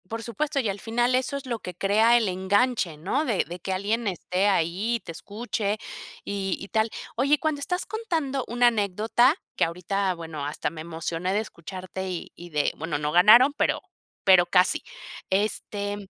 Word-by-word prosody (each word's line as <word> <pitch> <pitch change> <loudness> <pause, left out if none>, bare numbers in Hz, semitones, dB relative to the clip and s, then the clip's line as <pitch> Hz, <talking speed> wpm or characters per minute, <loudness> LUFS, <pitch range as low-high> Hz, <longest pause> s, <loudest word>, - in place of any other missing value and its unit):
Por 225 0 -4
supuesto, 280 +6 -2
y 245 - 0
al 195 +1 -4
final, 240 +3 +1
eso 260 +2 0
es 280 - -8
lo 235 -3 -3
que 180 - -7
crea 215 +6 +4
el 225 -3 +1
enganche, 190 -1 +1
¿no? 195 - -1
De 225 -8 +1
de 175 +1 -7
que 190 - -4
alguien 210 +5 -1
esté 185 +1 0
ahí 195 +5 +1
y - - -2
te 170 - -9
escuche 210 +3 -3 0.5
y 195 -2 -2
y 195 - -8
tal. 220 0 +1 0.3
Oye, 280 +5 +3
cuando 310 -2 -1
estás 360 +6 -1
contando 320 - -2
una 245 +1 +3
anécdota 225 - +3 0.2
que - - +2
ahorita, 185 +3 -1
bueno, 160 -4 -6
hasta 150 0 -2
me 155 0 -8
emocioné 165 +2 -3
de 205 - +2
escucharte 190 -1 -6
y 180 -2 -5
y 175 0 -11
de 150 -2 0
bueno, 160 -1 -2
no 150 0 -2
ganaron, 215 - +7
pero - - 0 0.4
pero 185 -2 +6
casi. 180 +1 +3 0.5
Este, 205 0 -2
200 Hz, 185 wpm, -26 LUFS, 180-240 Hz, 0.5 s, ganaron